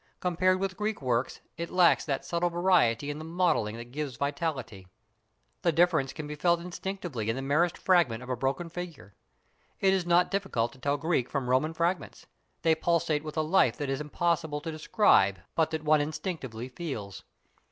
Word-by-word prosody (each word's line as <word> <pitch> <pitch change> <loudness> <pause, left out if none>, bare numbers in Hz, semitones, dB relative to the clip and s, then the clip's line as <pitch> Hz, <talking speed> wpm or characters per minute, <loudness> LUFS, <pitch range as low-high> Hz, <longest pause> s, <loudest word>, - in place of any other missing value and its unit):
Compared 185 +1 +2
with 190 -1 -2
Greek 210 +1 -2
work 125 -1 0 0.3
it 170 +1 -4
lacks 180 -2 +4
that 135 -4 -2
subtle 175 +1 0
variety 145 -8 +2
in 145 - -6
the - - -7
modelling 160 -10 0
that 120 +1 -9
gives 145 -2 -4
vitality. 140 - -3 0.7
The 170 - +3
difference 160 -5 +2
can 155 - -7
be 150 - -6
felt 170 +3 +2
instinctively 175 - -5
in 115 - 0
the 135 - -4
merest 155 +5 +1
fragment 140 -11 +2
of 125 - -10
a - - +1
broken 135 +7 -2
figure. 165 - -8 0.7
It 190 -1 +4
is 185 -2 0
not 175 +1 +4
difficult 195 -13 -1
to 135 - -17
tell 140 +2 0
Greek 150 -5 0
from 130 -3 -2
Roman 155 +6 +1
fragments, 170 +3 -2 0.4
they 165 0 +5
pulsate 160 -2 +1
with 155 0 -7
a 155 - +2
life 170 +5 +3
that 145 -3 -2
it - - +1
is 135 - -3
impossible 160 0 -1
to 160 - -4
describe 155 - +3 0.2
but 160 -1 +2
that 160 -1 -4
one 155 -1 +4
instinctively 145 - -4
feels. 125 - -6
155 Hz, 185 wpm, -29 LUFS, 135-175 Hz, 0.7 s, they